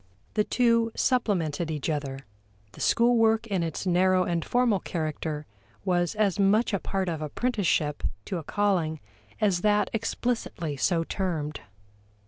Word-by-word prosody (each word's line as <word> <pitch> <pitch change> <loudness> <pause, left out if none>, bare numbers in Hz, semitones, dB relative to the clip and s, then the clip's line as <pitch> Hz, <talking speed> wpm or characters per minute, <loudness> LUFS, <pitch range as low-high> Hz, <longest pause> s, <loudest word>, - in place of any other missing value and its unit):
The 210 - +2
two 230 -1 +2
supplemented 175 - 0
each 150 -3 -3
other; 145 -4 -2 0.5
the - - -12
school 240 +1 +4
work 225 0 +3
in 195 -5 -1
its 165 +2 -3
narrow 185 +1 +3
and 170 -2 -1
formal 240 -5 +2
character 155 -3 -3 0.4
was 175 +1 +1
as 205 -2 +1
much 210 +3 +3
a 200 - +1
part 190 0 -2
of 160 -3 -2
apprenticeship 155 - 0 0.2
to 185 - -3
a - - -8
calling 175 -4 0 0.4
as 195 -5 +2
that 210 0 +2
explicitly 225 -8 -2
so 165 +4 +1
termed. 160 -5 -3
185 Hz, 140 wpm, -27 LUFS, 160-215 Hz, 0.5 s, school